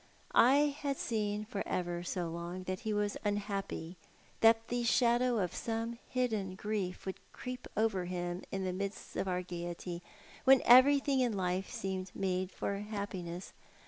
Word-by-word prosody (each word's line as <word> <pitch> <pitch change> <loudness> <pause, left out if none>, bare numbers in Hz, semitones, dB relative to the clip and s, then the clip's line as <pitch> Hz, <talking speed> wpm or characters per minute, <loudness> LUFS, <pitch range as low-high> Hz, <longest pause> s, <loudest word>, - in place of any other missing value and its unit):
I 285 +3 +5
had 280 -2 -1
seen 210 -2 -1
for 205 -3 -4
Iver 175 -1 -1
so 175 -2 -3
ong 175 +2 -5
that 185 0 -3
he 220 -2 -3
was 205 -1 0
unhappy, 200 -4 -2 0.4
that 225 0 +5
the 245 0 0
shadow 240 +1 +3
of 180 -5 0
some 230 0 -3
hidden 220 -7 -1
grief 200 -3 -3
uould 190 - -3 0.2
creep 250 0 -6
over 210 -4 +2
him 175 0 -3
in 195 0 -2
the 185 -1 -1
midst 200 +2 -5
of - - -1
our 180 -1 0
gaiety 175 0 -5 0.4
w 270 0 +8
en - - -7
everything 270 +2 +7
m 245 -3 +2
life 185 -1 -1
seemed 190 -1 -3
made 185 -1 0
for 200 +1 -3
happiness. 200 -4 -5
200 Hz, 160 wpm, -33 LUFS, 185-230 Hz, 0.4 s, w